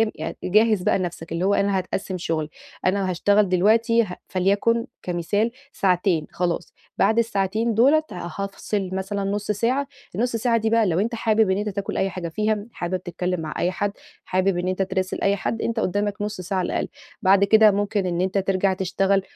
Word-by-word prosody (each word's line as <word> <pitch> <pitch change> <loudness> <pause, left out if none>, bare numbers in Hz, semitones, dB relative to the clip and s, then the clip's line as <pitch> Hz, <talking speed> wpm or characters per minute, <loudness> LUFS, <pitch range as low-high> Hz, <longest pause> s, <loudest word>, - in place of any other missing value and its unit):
يعني 160 +1 -5
جَهِّز 215 +1 +3
بقى 195 - +2
نفسك 170 -2 -5
اللي 170 +3 -1
هو 200 - +3
أنا 200 -1 +2
هاتقسم 185 0 -3
شوية، 160 -3 -2 0.4
أنا 190 0 +1
هاشتغل 200 +2 +3
دلوقتي 225 +5 +4
ه 180 -4 -6
فليكن 200 +5 +1 0.2
كمثال 185 +6 0 0.2
ساعتين 180 -4 +1
خلاص، 175 -2 -2 0.2
بعد 225 - +3
الساعتين 220 0 +1
دُولَة 280 +8 +4
هافصل 195 +2 -4
مثلًا 195 +1 -2
نُصّ 205 0 -1
ساعة، 250 +7 0 0.3
النُصّ 235 +3 0
ساعة 230 0 +2
دي 220 0 0
بقى 225 -1 +3
لو 175 -1 +1
أنت 230 +3 0
حابب 220 -2 +2
إن 190 - +2
أنت 210 +1 -2
تاكل 200 0 -4
أي 195 - +1
حاجة 180 -2 -5
فيها، 210 +3 -1
حابب 180 +1 -3
تتكلم 180 0 -2
مع 155 -1 -5
أي 180 - +1
حد، 205 +2 -1 0.3
حابب 185 0 +1
إن 180 +1 -2
أنت 185 +1 -1
تِراسل 190 0 -2
أي 200 0 +3
حد، 225 +3 -3
أنت 230 -1 -1
قُدّامك 205 +1 -1
نُصّ 210 -2 -3
ساعة 190 +2 -3
على 180 - 0
الأقل، - - -1 0.3
بعد 195 +1 +5
كده 215 +1 +6
ممكن 205 -1 0
إن 175 0 -1
أنت 190 +1 0
ترجع 190 0 +1
تشتغل 195 +1 +1
195 Hz, 190 wpm, -23 LUFS, 185-215 Hz, 0.4 s, كده